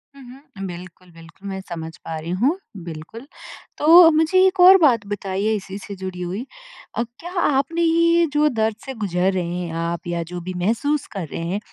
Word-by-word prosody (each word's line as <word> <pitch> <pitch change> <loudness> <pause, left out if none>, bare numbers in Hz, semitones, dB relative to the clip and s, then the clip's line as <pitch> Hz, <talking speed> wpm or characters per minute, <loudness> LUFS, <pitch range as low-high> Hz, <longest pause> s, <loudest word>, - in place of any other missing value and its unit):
हुँ, 275 - -13 0.3
हुँ। 195 - -5
बिल्कुल, 180 0 -11
बिल्कुल 165 +4 -14
मैं 190 0 -4
समझ 165 -1 -6
पा 160 - -7
रही 160 +2 -7
हूँ, 290 +9 +2 0.3
बिल्कुल। 170 - -9 0.5
तो 330 +3 +8
मुझे 320 +3 +2
एक 375 0 +1
और 370 +2 +9
बात 240 -8 +4
बताइए 200 +1 -2
इसी 195 -1 -6
से 200 0 -8
जुड़ी 185 -1 -7
हुई। 185 +7 -4 0.5
अ, 235 - 0 0.2
क्या 350 +1 -8
आपने 285 +4 +1
ये 335 +1 +3
जो 300 0 +3
दर्द 220 -4 0
से 270 - -5
गुज़र 190 -5 0
रहे 185 -1 -1
हैं 175 -2 -4
आप 170 +1 -4
या 170 -1 -2
जो 180 - -4
भी 185 +2 -6
महसूस 240 +10 0
कर 185 -5 -4
रहे 160 - -6
हैं, 195 +3 -1
200 Hz, 195 wpm, -21 LUFS, 180-295 Hz, 0.5 s, और